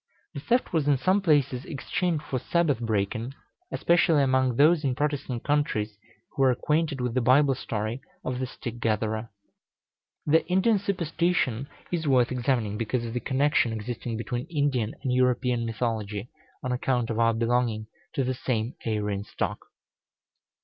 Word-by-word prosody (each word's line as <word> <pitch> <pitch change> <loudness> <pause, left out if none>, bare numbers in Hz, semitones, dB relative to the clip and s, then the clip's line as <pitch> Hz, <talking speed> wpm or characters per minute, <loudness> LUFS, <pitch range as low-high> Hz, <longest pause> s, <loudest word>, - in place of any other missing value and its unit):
The - - -5
theft 240 - 0
was 155 -4 +1
in 145 -2 +4
some 185 +10 +2
places 145 -7 +2
exchanged 160 +2 -2
for 130 -3 -2
Sabbath 165 -3 +1
breaking, 110 +3 -1 0.4
especially 165 -3 +3
among 130 -2 +2
those 155 +4 +5
in 130 -3 0
Protestant 145 -4 -2
countries 145 -8 0 0.4
who - - -3
were 135 - +6
acquainted 150 +3 0
with 125 -2 -1
the 130 - +1
Bible 135 +3 +5
story 115 -1 -3 0.2
of 125 -1 -2
the 130 - -2
stick 120 -2 -7
gatherer. 110 0 -1 1.0
The 160 +2 +4
Indian 190 +4 +3
superstition 170 - 0 0.2
is 165 -3 -1
worth 130 -3 +3
examining, 120 -5 0
because 120 +1 -1
of 115 - -5
the 125 - -1
connection 135 -1 +2
existing 115 +1 -4
between 120 +2 -4
Indian 140 -8 0
and 130 -3 0
European 125 -1 +2
mythology, 110 -2 -3 0.3
on 130 - -2
account 125 -2 0
of 115 - -2
our 115 -1 +3
belonging 115 -1 +1 0.3
to 135 - +1
the 130 +1 0
same 120 -2 -2
Aryan 105 -2 -1
stock. - - -4
125 Hz, 155 wpm, -27 LUFS, 115-145 Hz, 1.0 s, were